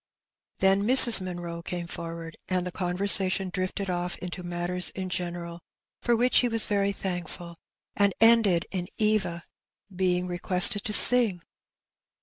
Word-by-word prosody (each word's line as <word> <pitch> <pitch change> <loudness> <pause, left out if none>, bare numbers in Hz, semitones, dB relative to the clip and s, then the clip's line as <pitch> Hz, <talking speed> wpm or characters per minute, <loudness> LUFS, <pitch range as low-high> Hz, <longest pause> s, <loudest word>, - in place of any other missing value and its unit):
Then 195 +1 +1
Mrs. 235 -1 +8
Munroe 175 -2 -8
came 175 0 -7
forward, 165 -1 -10
and 185 -1 -3
the 180 - -7
conversation 190 +1 -1
drifted 185 +1 -5
off 180 -1 -5
into 180 0 -9
matters 175 +1 0
in 185 -1 -8
general, 175 -1 -7 0.4
for 240 - -1
which 245 +2 +1
he 250 - -1
was 225 -2 +2
very 200 -1 -2
thankful, 175 -3 -8 0.4
and 200 -1 0
ended 225 -6 +2
in 180 -2 -6
Eva 200 -6 -3 0.5
being 180 -1 -2
requested 180 +3 +1
to 210 - -4
sing. 215 -6 +5
185 Hz, 135 wpm, -24 LUFS, 175-200 Hz, 0.5 s, Mrs